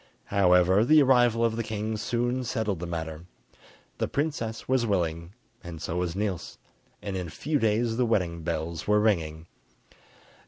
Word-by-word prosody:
However, 95 0 +4
the 150 +4 +6
arrival 120 -3 +4
of 115 -1 0
the 115 - -2
king 110 0 -3
soon 120 +3 -1
settled 110 -6 -2
the 90 - -5
matter: 80 -1 -5 0.7
the - - 0
princess 140 -7 -3
was 130 -1 +2
willing 85 -3 -1 0.3
and 85 -2 -8
so 85 +2 -4
was 90 -1 -2
Niels, 100 -3 -3 0.5
and 100 - -4
in 90 -2 -3
a - - -8
few 150 - -2
days 115 +1 +1
the 125 - +2
wedding 90 -7 0
bells 80 0 -4
were 105 0 +4
ringing. 80 -7 0
105 Hz, 160 wpm, -27 LUFS, 85-115 Hz, 0.7 s, the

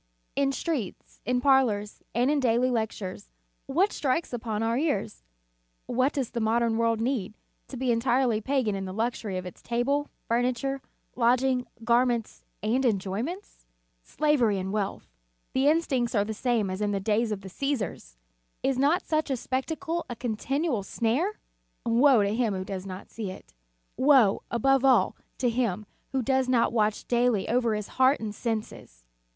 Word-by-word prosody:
In 275 -1 +2
streets, 275 - -4
in 250 0 +1
parlors, 245 -7 +2
and 245 +4 +3
in 300 - +2
daily 250 0 +2
lectures, 215 - -3 0.4
what 360 +9 +2
strikes 280 +1 -1
upon 225 -2 -2
our 230 +1 +1
ears? 245 - -1 0.6
What 255 +3 +1
does 265 -5 -2
the 235 - -2
modern 225 0 +1
world 230 -1 +2
need, 225 -4 -1 0.3
to 265 - -8
be 255 0 +1
entirely 235 -1 +2
pagan 260 -3 0
in 195 -1 -3
the 185 0 -6
luxury 220 -3 -2
of 185 - -5
its 180 - -9
table, 275 +5 0 0.2
furniture, 250 +3 0 0.3
lodging, 250 +1 +2 0.2
garments 235 -1 +1 0.2
and 240 +5 +1
enjoyments? 220 - -2 0.3
Slavery 255 - +1
and 190 +1 -3
wealth. 205 -2 -2 0.5
The 265 +2 +2
instincts 275 -7 +1
are 205 -1 +3
the 220 - -3
same 225 -3 0
as 190 +2 -4
in 205 -1 0
the 200 - 0
days 215 +3 +1
of 205 -2 -3
the 195 - -9
Csesars! 205 - -3 0.5
Is 270 -1 +1
not 310 +7 +2
such 310 -1 0
a 265 - 0
spectacle 320 +8 -3
a 240 - -4
continual 245 +3 -1
snare? 250 - -1 0.5
Woe 240 0 +5
to 200 +1 0
him 225 -4 +1
who 185 0 -4
does 190 -1 -5
not 185 0 -8
see 215 -4 -5
it! 185 - -11 0.4
Woe, 260 -7 +5
above 270 +3 +2
all, 265 -2 +4 0.2
to 255 - +1
him 225 -4 -1 0.3
who 265 -1 0
does 265 0 +1
not 235 -2 +3
watch 215 -2 0
daily 240 -4 +2
over 235 -2 +1
his 210 -1 -4
heart 260 +2 +5
and 215 -2 -4
senses! 210 - -5
240 Hz, 165 wpm, -27 LUFS, 215-265 Hz, 0.6 s, Woe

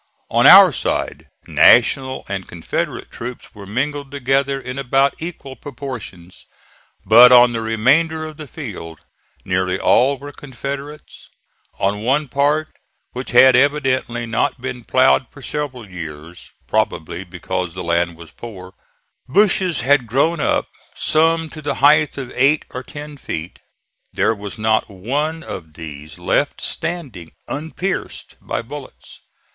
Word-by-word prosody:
On - - +5
our - - +9
side - - -3 0.2
National 130 -1 +4
and 95 -2 -5
Confederate 85 -1 -4
troops 125 +1 -8
were 100 -2 -11
mingled 140 +6 -3
together 135 0 0
in 130 0 -6
about 135 +1 +2
equal 160 -5 -7
proportions; 120 -11 -9 0.6
but 120 +3 +8
on 120 -1 +7
the 115 - -2
remainder 140 +9 +1
of 155 -1 -9
the 155 - -9
field 100 - -8 0.5
nearly 90 0 0
all 135 +7 +3
were 145 +2 -9
Confederates. 140 +2 -8 0.5
On 100 +2 -1
one 135 +5 0
part, 145 +4 +1 0.4
which 125 +1 -6
had 130 +2 +7
evidently 130 -3 +1
not 115 +4 -1
been 125 -1 -6
ploughed 130 +1 +3
for 135 - -15
several 135 -7 -5
years, 80 -2 -9 0.2
probably 85 +3 -1
because 90 -1 -5
the 90 - -5
land 85 0 0
was 85 -2 -13
poor, 95 -6 -10 0.6
bushes 190 -1 +2
had 135 -1 +2
grown 140 +8 +1
up, - - 0 0.3
some 165 +1 +2
to 155 - -9
the 145 - -2
height 150 +2 +4
of 130 -3 -6
eight 140 +4 +2
or 125 - -5
ten 145 +2 -9
feet. 80 - -6 0.5
There - - +1
was 105 -2 -8
not 110 0 +1
one 145 - -3
of 80 -4 -8
these 75 -2 -9
left - - 0
standing 130 - -5
unpierced 160 +6 -5
by - - -4
bullets. 140 +3 -11
130 Hz, 135 wpm, -19 LUFS, 100-145 Hz, 0.6 s, our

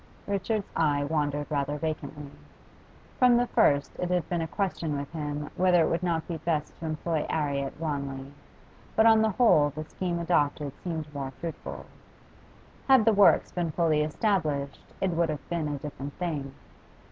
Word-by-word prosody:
Richard's 200 +1 -2
eye 145 -3 +2
wandered 145 -1 -1
rather 145 0 -1
vacantly. 150 -2 -5 0.9
From 250 -2 +6
the 245 - +3
first 145 -11 +2
it 180 - -1
had 180 -3 0
been 175 -2 0
a 160 - -2
question 160 -5 -2
with 140 0 -5
him 150 -2 -4
whether 180 -2 +4
it - - 0
would 165 - 0
not 170 -3 -1
be 170 - -3
best 155 -2 -2
to 165 - -4
employ 155 0 -1
'Arry 145 -3 0
at 135 +1 -6
Wanley, 140 -3 -4 0.6
but 220 - +5
on 225 -1 +7
the 220 - +3
whole 190 -9 +4
the 155 +2 -6
scheme 175 +2 -3
adopted 150 -4 +1
seemed 160 -4 -4
more 140 -2 -4
fruitful. 165 -1 -6 1.0
Had 265 -5 +6
the 225 - +5
works 200 -1 +5
been 175 -2 -1
fully 155 -2 +2
established 150 -4 0 0.2
it 190 - +1
would 170 -1 +1
have 150 -3 -5
been 170 -3 -1
a 145 -1 -2
different 140 0 -7
thing. 150 -6 -3
155 Hz, 170 wpm, -28 LUFS, 145-180 Hz, 1.0 s, on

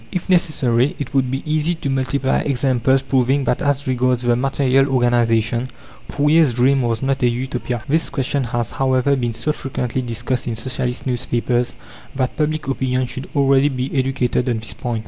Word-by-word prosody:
If 180 - -4
necessary, 145 -9 +2
it 140 -2 -6
would 130 -2 +2
be 135 +2 -3
easy 155 +2 0
to 160 - -5
multiply 135 0 0
examples 130 -1 +1
proving 135 +1 +1
that 125 - 0
as 145 -1 0
regards 125 -1 +1
the 120 -1 +3
material 135 +1 +2
organization 120 -1 +1 0.4
Fourier's 150 -2 +3
dream 135 +2 +3
was 115 -1 -1
not 135 0 0
a 125 - +4
Utopia. 125 -1 -3
This 160 +3 +1
question 135 0 -1
has, 120 -1 -2
however, 130 +1 +1
been 120 -3 -2
so 115 +7 -1
frequently 130 -3 -3
discussed 120 +1 -3
in 115 - -2
Socialist 125 +1 -3
newspapers 120 -1 -1 0.4
that 130 -2 -1
public 155 -1 -1
opinion 130 -1 0
should 130 +2 -7
already 140 0 +4
be 130 -1 -3
educated 130 -2 0
on 120 - 0
this 110 +1 -6
point. 120 -2 -3
130 Hz, 170 wpm, -20 LUFS, 120-140 Hz, 0.4 s, a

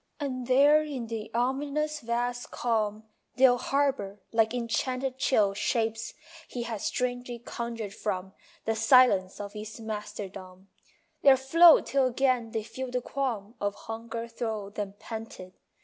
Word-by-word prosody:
And 255 -4 -3
there 285 +4 +6
in 285 -6 -4
the 225 -1 -5
ominous 290 +5 0
vast 245 0 -2
calm 215 -3 -1 0.3
They'll 255 -2 +5
harbour, 270 -9 0
like 225 -1 +3
enchanted 255 +2 -2
Chill 210 -7 +3
shapes 225 +2 -1 0.3
he 245 - -4
has 225 -4 -5
strangely 245 -1 -2
conjured 230 -3 -5
from 190 -2 -3 0.3
The 225 - +1
silence 225 -5 +4
of 205 0 -6
his 215 +1 -8
masterdom; 195 -3 -7 0.5
There 270 -1 +7
float 325 +5 +7
till 270 -1 +2
again 255 -2 +1
they 220 -1 -3
feel 260 +4 -6
the 250 0 -1
qualm 240 -6 -3
Of 205 0 -1
hunger 230 +1 -6
thro 220 -3 -4
them 200 -1 -5
panted. 220 -5 -8
235 Hz, 135 wpm, -28 LUFS, 215-255 Hz, 0.5 s, There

